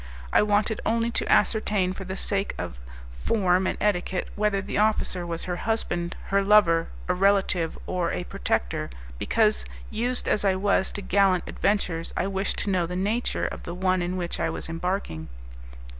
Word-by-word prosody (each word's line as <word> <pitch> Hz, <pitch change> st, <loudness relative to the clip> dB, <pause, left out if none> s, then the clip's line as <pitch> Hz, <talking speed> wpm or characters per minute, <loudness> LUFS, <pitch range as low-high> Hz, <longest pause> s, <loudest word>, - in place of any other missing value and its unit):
I -, -, +6 dB
wanted 210 Hz, +1 st, +1 dB
only 230 Hz, +1 st, +1 dB
to -, -, -1 dB
ascertain, 205 Hz, -4 st, +2 dB
for 190 Hz, 0 st, -7 dB
the 190 Hz, +1 st, -5 dB
sake 200 Hz, 0 st, 0 dB
of -, -, -5 dB, 0.4 s
form 185 Hz, -3 st, +2 dB
and -, -, -2 dB
etiquette, 190 Hz, -2 st, 0 dB
whether 210 Hz, -1 st, +1 dB
the 195 Hz, +1 st, -2 dB
officer 210 Hz, -4 st, +1 dB
was 165 Hz, -1 st, -2 dB
her 180 Hz, -1 st, -3 dB
husband, 175 Hz, -5 st, -1 dB
her 200 Hz, 0 st, +3 dB
lover, 195 Hz, -5 st, +5 dB, 0.2 s
a 180 Hz, -, +2 dB
relative 190 Hz, -3 st, +2 dB
or 180 Hz, -2 st, -1 dB
a -, -, -2 dB
protector, -, -, -2 dB, 0.3 s
because, 215 Hz, -2 st, +2 dB, 0.3 s
used 245 Hz, +3 st, -1 dB
as 210 Hz, -, +2 dB
I 195 Hz, -2 st, +3 dB
was 195 Hz, 0 st, +1 dB
to 205 Hz, -, -5 dB
gallant 190 Hz, -1 st, +3 dB
adventures, 180 Hz, -5 st, -1 dB
I -, -, +1 dB
wished 195 Hz, 0 st, -1 dB
to 200 Hz, -, -1 dB
know 180 Hz, -3 st, +1 dB
the 180 Hz, -, -5 dB
nature 210 Hz, +6 st, 0 dB
of -, -, -4 dB
the 170 Hz, -, -6 dB
one 185 Hz, 0 st, +1 dB
in 180 Hz, +1 st, -2 dB
which 175 Hz, -1 st, -3 dB
I -, -, +1 dB
was -, -, -4 dB
embarking. 165 Hz, -, -3 dB
190 Hz, 175 wpm, -26 LUFS, 180-210 Hz, 0.4 s, I